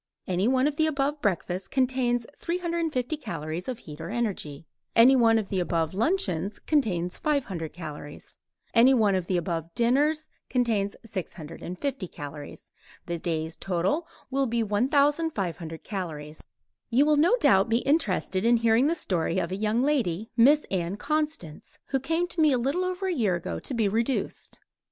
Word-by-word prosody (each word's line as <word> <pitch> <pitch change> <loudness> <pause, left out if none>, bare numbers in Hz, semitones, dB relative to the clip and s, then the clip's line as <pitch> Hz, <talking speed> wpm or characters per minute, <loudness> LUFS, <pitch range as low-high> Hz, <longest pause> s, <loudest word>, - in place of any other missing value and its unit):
Any 185 +3 0
one 260 +1 +3
of 295 0 0
the 315 - +3
above 290 0 -1
breakfasts 185 -1 -1
contains 250 -1 +1
350 335 -6 -2
calories 165 - -5
of 255 -3 -3
heat 155 -8 -10
or 165 - -5
energy. 195 -10 -3 0.3
Any 245 +4 +7
one 230 -3 +5
of 215 -3 -2
the 190 - 0
above 165 -2 0
luncheons 205 - 0
contains 185 - 0
500 210 - -1
calories. 150 -4 -9 0.4
Any 250 +3 +6
one 215 -4 +3
of 185 -2 -1
the 185 - +1
above 165 -1 -2
dinners 295 +6 +2 0.2
contains 225 -6 0
650 185 - -5
calories. 145 -2 -9 0.3
The 170 -1 -3
day's 160 -1 -2
total 195 - -1 0.2
will 270 0 +1
be 235 0 0
1500 220 - 0
calories. 155 -6 -6 0.5
You 255 +4 +4
will 300 0 +4
no 345 +11 +4
doubt 195 - +4
be 225 - +3
interested 205 - +1
in 235 +1 +5
hearing 230 +3 +3
the 330 - +1
story 175 - -1
of 175 -1 -1
a - - -1
young 215 +4 +1
lady, 225 - 0
Miss 280 +6 +6
Ann 180 0 -1
Constance, 300 - -3
who 270 - +1
came 330 +6 0
to 340 - -2
me 305 -2 +5
a 255 - +3
little 275 +10 0
over 370 +1 -3
a 375 - 0
year 215 - +1
ago 175 - -4
to - - -6
be 225 -3 +2
reduced. 230 +6 -2
225 Hz, 165 wpm, -27 LUFS, 180-280 Hz, 0.5 s, Any